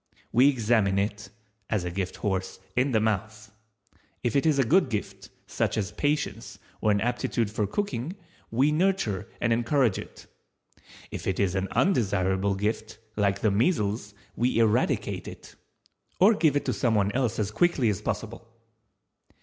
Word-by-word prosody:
We 130 +4 +6
examine 110 -6 +2
it 105 +1 -2 0.4
(as 105 -5 0
a 90 - -3
gift 90 0 -3
horse) 95 -2 -3 0.2
in 130 +2 +2
the 110 - +3
mouth. 110 0 -2 0.7
If 120 - 0
it 140 +3 +3
is 150 -3 +3
a 135 - +4
good 155 +4 +3
gift, 105 -4 -5 0.2
such - - -1
as 100 -2 -1
patience, 150 +4 -2 0.2
or 110 - +2
an 100 -1 +3
aptitude 115 -1 -1
for 105 -1 -1
cooking, 155 - -3 0.3
we 135 +6 +2
nurture 155 - 0
and 115 -1 +2
encourage 120 -1 +2
it; - - -11 0.9
if - - -6
it 95 - -1
is 95 -3 +1
an 95 0 -1
undesirable 100 - +1
gift, 110 +2 -3 0.2
like 100 -1 +1
the 110 - +3
measles, 105 - 0 0.2
we 120 +1 +1
eradicate 110 -2 +1
it, - - -11 0.7
or 200 +5 +7
give 160 -8 +2
it 145 - 0
to - - 0
someone 105 -5 +1
else 125 -1 0
as 105 -1 -1
quickly 140 0 +2
as 100 - -2
possible. 115 - -4
110 Hz, 155 wpm, -27 LUFS, 100-130 Hz, 0.9 s, or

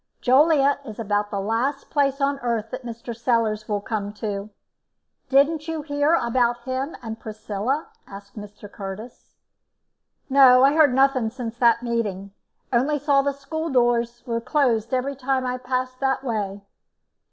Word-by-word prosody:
"Joliet 280 +1 +4
is 220 -5 -9
about 205 -2 -1
the 200 -1 -3
last 235 +8 -2
place 275 -2 +1
on 280 0 +1
this 275 - -16
earth 230 -2 -2
that - - -6
Mr. 235 0 -7
Sellars 225 -2 0
will 205 -1 -1
come 205 -1 -3
to. 205 -1 -4 0.8
Didn't 295 +3 +3
you 320 -2 -3
hear 290 +2 +2
about 240 -3 +1
him 260 +4 -3
and 225 -1 -6
Priscilla?" 220 +6 -3 0.2
asked 200 0 -12
Mr. 210 -1 -10
Curtis. 200 +4 -9 0.9
"No, 265 -2 +7
I 275 +1 +5
heard 300 -5 +4
nothing 265 -4 +3
since 235 -1 -6
that 235 -1 +4
meeting; 205 -5 -2 0.4
only 275 +5 +2
saw 285 -1 +3
the 280 +1 0
school 315 +4 -5
doors 240 -2 +1
were 230 -2 -2
closed 235 -5 +1
every 265 +2 -1
time 265 0 -1
I 250 0 -2
passed 255 0 -3
that 265 -1 0
way." 205 -5 -3
245 Hz, 155 wpm, -23 LUFS, 220-275 Hz, 0.9 s, No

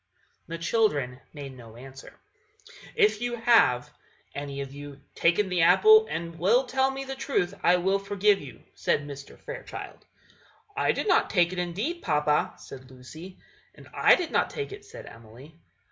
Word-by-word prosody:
The 165 - -5
children 165 - 0
made 140 -3 -9
no 115 -3 -13
answer. 135 +2 -13 0.8
"If 425 - +3
you 240 0 -2
have, 225 - +3 0.4
any 140 -1 -6
of 135 0 -7
you, 145 0 -10
taken 175 +4 +2
the 180 -2 0
apple, 435 - +6
and 170 0 -5
will 220 +10 +3
tell 265 +1 +1
me 270 0 -5
the 270 0 -6
truth, 265 -9 -1
I 175 - +4
will 190 +2 +1
forgive 200 0 +1
you," 140 -3 -12
said 145 - -1
Mr. 140 -1 -10
Fairchild. - - -9 0.7
"I 425 - +2
did - - -3
not 370 - +3
take 175 -2 +2
it, 180 - -4
indeed, 210 - -3
papa," 150 -3 0
said 130 -1 -12
Lucy. 155 +9 -12 0.4
"And - - -15
I - - +5
did 350 -3 -4
not - - +1
take 430 -3 -5
it," 405 0 -10
said - - -11
Emily. 120 +7 -14
175 Hz, 165 wpm, -26 LUFS, -, 0.8 s, apple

